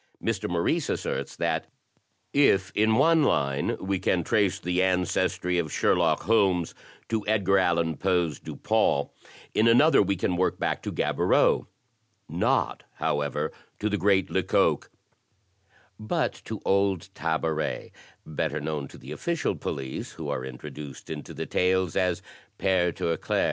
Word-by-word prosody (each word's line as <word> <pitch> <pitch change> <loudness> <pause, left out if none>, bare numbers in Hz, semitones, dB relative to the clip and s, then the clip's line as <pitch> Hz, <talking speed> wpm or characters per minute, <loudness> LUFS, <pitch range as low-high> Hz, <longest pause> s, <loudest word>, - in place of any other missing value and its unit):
Mr. - - -1
Maurice 90 - 0
asserts - - -3
that, - - -1 0.7
"If 95 -10 +3
in 110 +1 +3
one 160 +6 +5
line 70 - +1
we 95 0 -1
can 90 -2 +1
trace 100 -1 +2
the 90 +1 0
ancestry 90 -1 +1
of 80 -4 -2
Sherlock - - +2
Holmes 95 -6 +2 0.4
to 110 -2 -1
Edgar 100 -3 +3
Allan 85 -4 +1
Poe's 90 -6 0
Dupin, 70 - 0 0.4
in 110 - +3
another 140 +8 +6
we 100 0 +1
can 90 -1 -1
work 90 - +1
back - - -1
to - - -4
Gaboriau, - - +2 0.6
not, 85 +4 0
however, 75 0 -1 0.3
to 105 - -1
the 105 - 0
great 95 -1 +2
Lecoq, - - +1 1.1
but 110 - -1
to - - -5
old 100 -1 +1
Tabaret, 80 -2 -2 0.3
better 75 0 -2
known 75 -2 -3
to - - -13
the 65 - -11
official 170 - -1
police 65 -1 -5
who - - -6
are 65 - -2
introduced 70 +2 -8
into - - -6
the - - -5
tales 90 -2 +1
as 90 -2 0 0.3
Pere 90 -2 +2
Tirauclair. 85 0 -1
90 Hz, 140 wpm, -26 LUFS, 80-100 Hz, 1.1 s, another